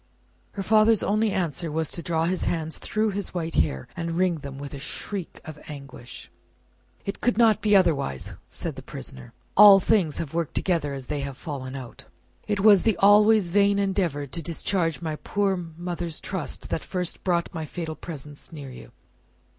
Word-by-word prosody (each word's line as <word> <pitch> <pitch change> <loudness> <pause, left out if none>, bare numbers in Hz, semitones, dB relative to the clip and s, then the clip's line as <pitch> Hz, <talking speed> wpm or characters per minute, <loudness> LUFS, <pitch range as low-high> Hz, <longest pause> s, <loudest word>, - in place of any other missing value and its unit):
Her 195 - -4
father's 215 +1 +4
only 215 +2 +2
answer 170 -4 -2
was 160 0 -1
to 170 - -3
draw 165 -1 0
his 185 +2 0
hands 160 -2 -1
through 215 +3 0
his 200 -1 -4
white 165 -2 -2
hair, 65 -5 0
and 165 -1 -3
wring 180 -3 +2
them 140 -2 -8
with 140 +1 -7
a 140 - -6
shriek 175 +5 -5
of 155 -1 -9
anguish. 140 -5 -9 0.7
"It 200 - -5
could 245 -3 +1
not 225 -2 +4
be 210 -1 +4
otherwise," 145 - +1
said - - -5
the - - -6
prisoner. 65 -1 -9 0.2
"All 200 -1 +10
things 185 -6 +2
have 160 -3 -4
worked 170 -2 -2
together 160 -6 0
as 135 -2 -7
they 150 +2 -3
have 140 -1 -5
fallen 135 -5 -6
out. 130 -3 -8 0.4
It 205 -2 0
was 205 -3 +7
the 220 -6 +2
always 210 -1 +5
vain 200 +2 +3
endeavour 185 -7 0
to 140 +5 -6
discharge 165 +1 -1
my 155 -2 -3
poor 200 +2 0
mother's 170 -1 -5
trust 190 -6 -4
that - - -1
first 180 -2 -3
brought 175 -2 0
my 160 -3 -4
fatal 160 0 -5
presence 150 -3 -7
near 145 -4 -8
you. 125 - -12
170 Hz, 180 wpm, -25 LUFS, 150-195 Hz, 0.7 s, All